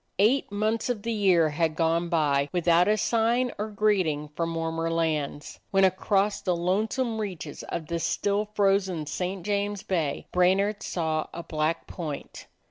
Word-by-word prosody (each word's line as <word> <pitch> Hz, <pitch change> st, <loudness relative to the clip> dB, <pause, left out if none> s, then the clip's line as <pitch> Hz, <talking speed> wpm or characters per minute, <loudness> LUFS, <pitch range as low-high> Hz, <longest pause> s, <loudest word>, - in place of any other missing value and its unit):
Eight 220 Hz, +4 st, +3 dB
months 215 Hz, +3 st, 0 dB
of 225 Hz, -5 st, -2 dB
the 230 Hz, -, -2 dB
year 185 Hz, -7 st, +4 dB
had 160 Hz, +1 st, 0 dB
gone 165 Hz, +1 st, +1 dB
by 145 Hz, -4 st, +2 dB
with 175 Hz, -1 st, -2 dB
out 170 Hz, +1 st, +5 dB
a 215 Hz, +1 st, +3 dB
sign 235 Hz, +3 st, +1 dB
or 210 Hz, -, -1 dB
greeting 185 Hz, -8 st, +1 dB
from 165 Hz, +2 st, -3 dB
warmer 165 Hz, 0 st, -2 dB
lands, 155 Hz, -3 st, -2 dB
when 195 Hz, 0 st, +3 dB
across 195 Hz, +2 st, +2 dB
the 180 Hz, -2 st, 0 dB
lonesome 220 Hz, +7 st, 0 dB
reaches 180 Hz, -8 st, -5 dB
of 165 Hz, -, -5 dB
the 170 Hz, +1 st, -3 dB
still 200 Hz, +5 st, 0 dB
frozen 195 Hz, -5 st, +2 dB
St. 180 Hz, +4 st, -4 dB
James 205 Hz, -1 st, -1 dB
Bay 160 Hz, -7 st, -1 dB
Brainard 195 Hz, +3 st, +2 dB
saw 160 Hz, -3 st, -1 dB
a 170 Hz, -, -5 dB
black 155 Hz, +1 st, -1 dB
point. 155 Hz, -5 st, -7 dB
180 Hz, 160 wpm, -27 LUFS, 165-205 Hz, -, out